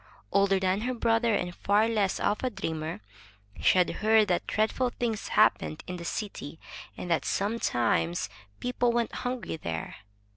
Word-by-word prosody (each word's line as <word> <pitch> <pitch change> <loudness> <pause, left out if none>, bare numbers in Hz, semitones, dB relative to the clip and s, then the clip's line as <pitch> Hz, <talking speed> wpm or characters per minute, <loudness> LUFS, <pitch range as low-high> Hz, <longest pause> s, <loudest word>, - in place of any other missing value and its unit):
Older 195 -1 +3
than 190 +2 +1
her 250 +2 -1
brother, 230 -1 +2
and 175 -2 -2
far 205 +4 +2
less 210 -4 +1
of 210 - 0
a 255 - +1
dreamer, 160 - -4 0.6
she - - +4
had 180 - +5
heard 215 -1 +4
that 175 - 0
dreadful 220 +4 +1
things 235 -3 -3
happened 185 -7 +2
in 180 - -5
the 170 - -7
city, 175 -6 -5 0.4
and 175 - -5
that 165 - +2
sometimes 120 - 0 0.3
people 245 -1 +1
went 235 -1 0
hungry 245 -9 -3
there. 80 - -5
205 Hz, 155 wpm, -28 LUFS, 175-230 Hz, 0.6 s, had